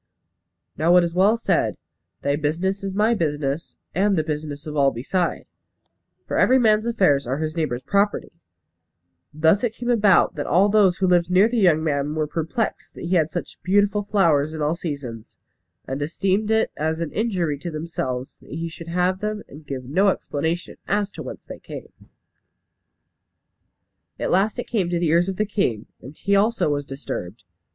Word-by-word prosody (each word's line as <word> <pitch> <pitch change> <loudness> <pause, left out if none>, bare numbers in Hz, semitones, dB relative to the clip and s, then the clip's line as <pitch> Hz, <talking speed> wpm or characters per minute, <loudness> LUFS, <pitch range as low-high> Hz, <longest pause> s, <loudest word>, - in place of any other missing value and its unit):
Now 170 +4 +5
it 180 - +5
is 170 -1 -2
well 200 +5 +4
said, 230 - 0 0.5
"Thy 140 0 +1
business 170 +7 -1
is 195 -1 -4
my 215 +3 +3
business, 150 -5 -2 0.2
and 195 +1 +2
the 155 - +2
business 150 -1 -5
of 155 -1 -6
all 140 -2 +4
beside;" 170 +9 -2 0.8
for - - -1
every 260 - +5
man's 220 -2 +3
affairs 180 - +2
are 130 +2 -1
his 155 +1 -3
neighbours' 140 -7 -2
property. 200 +1 0 1.0
Thus 160 +7 +3
it 230 -2 -1
came 245 +1 -2
about 205 -6 +4
that 145 - -4
all 190 +6 +4
those 200 -4 +4
who 190 - +1
lived 175 -1 +3
near 185 +4 +5
the 235 0 -1
young 165 -6 +4
man 145 -1 -1
were 155 -1 0
perplexed 165 +9 -3
that - - -9
he 170 +2 -2
had 160 -3 +3
such - - -6
beautiful 205 +3 +2
flowers 165 -7 +2
in 155 - -5
all 150 +2 +1
seasons; 140 -10 -6 0.5
and 135 +2 -4
esteemed 195 +7 0
it 220 0 +2
as 160 +1 -1
an 165 -3 -3
injury 180 -10 -1
to 170 - -5
themselves 155 -5 -4
that - - -19
he 165 +3 -4
should 165 0 -10
have 180 +2 0
them 210 0 -3
and 145 +1 -13
give 130 -2 -4
no 170 +11 +2
explanation 165 -2 -2
as 205 +1 0
to - - -8
whence - - -8
they - - -9
came. - - -10 2.2
At - - -2
last 200 +5 +2
it 245 - -3
came 195 -7 0
to 175 - 0
the 170 -2 +1
ears 170 +3 +3
of 190 - -3
the 215 - 0
king, 195 - -1 0.2
and 135 +6 -11
he 200 0 +1
also 215 -3 +2
was 145 -1 -1
disturbed. 120 -8 -6
170 Hz, 185 wpm, -23 LUFS, 150-200 Hz, 2.2 s, Now